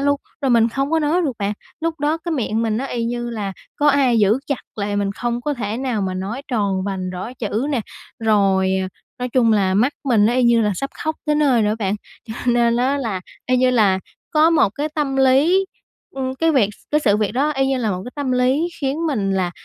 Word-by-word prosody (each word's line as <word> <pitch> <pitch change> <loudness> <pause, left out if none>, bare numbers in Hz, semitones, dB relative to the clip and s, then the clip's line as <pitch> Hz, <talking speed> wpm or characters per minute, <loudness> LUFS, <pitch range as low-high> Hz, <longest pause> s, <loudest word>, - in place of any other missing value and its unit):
luôn, 285 0 +1 0.2
rồi 270 - +2
mình 230 -1 +4
không 275 +5 -2
có 325 - +3
nói 315 +4 +1
được 290 -5 0
bạn. 200 -1 -1 0.3
Lúc 330 -1 -2
đó 300 +3 +1
cái 340 - -2
miệng 230 -5 -1
mình 220 -2 0
nó 260 - -2
y 235 -3 -3
như 240 0 -3
là 210 -4 -4 0.2
có 295 - +3
ai 270 -5 +3
giữ 210 +3 +4
chặt 280 - -2 0.2
lại 205 -1 -2
mình 200 -1 0
không 240 +2 -2
có 295 +3 -2
thể 220 -4 -3
nào 250 -5 -1
mà 185 -1 -2
nói 200 +8 -4
tròn 200 -6 0
vành 190 -2 -3
rõ 185 +6 -6
chữ 220 +3 -1
nè. 270 -5 0 0.4
Rồi, 195 -4 +2
ờ, 185 - -3 0.3
nói 250 0 -2
chung 235 -2 +3
là 190 -3 +2
mắt 245 +8 +3
mình 225 -6 +4
nó 230 - +2
y 255 - +2
như 235 -1 +4
là 210 - +1
sắp 275 +8 -4
khóc 315 0 -1
tới 300 - +2
nơi 270 -7 +3
rồi 210 - +2
đó - - -3
bạn. 200 -2 0 0.3
Cho 220 - -5 0.2
nên 235 -1 +3
á 260 +4 +1
là 220 -8 -2 0.3
y 255 0 +2
như 255 0 +3
là 210 -6 +3 0.3
có 310 +1 +4
một 320 -11 +4
cái 295 +1 -2
tâm 285 -3 -1
lý, 280 +9 +4 0.5
ừ, 270 - -2 0.2
cái 325 0 +3
việc 230 -8 +3 0.2
cái 300 - +3
sự 205 -1 +4
việc 210 -2 0
đó 280 +5 +1
y 270 -2 +1
như 270 0 +1
là 225 -4 0
một 180 - -2
cái 250 - -7
tâm 280 -3 -1
lý 260 +7 +2
khiến 290 +4 -1
mình 205 -10 0
là, 185 -2 0
240 Hz, 245 wpm, -20 LUFS, 210-280 Hz, 0.5 s, mình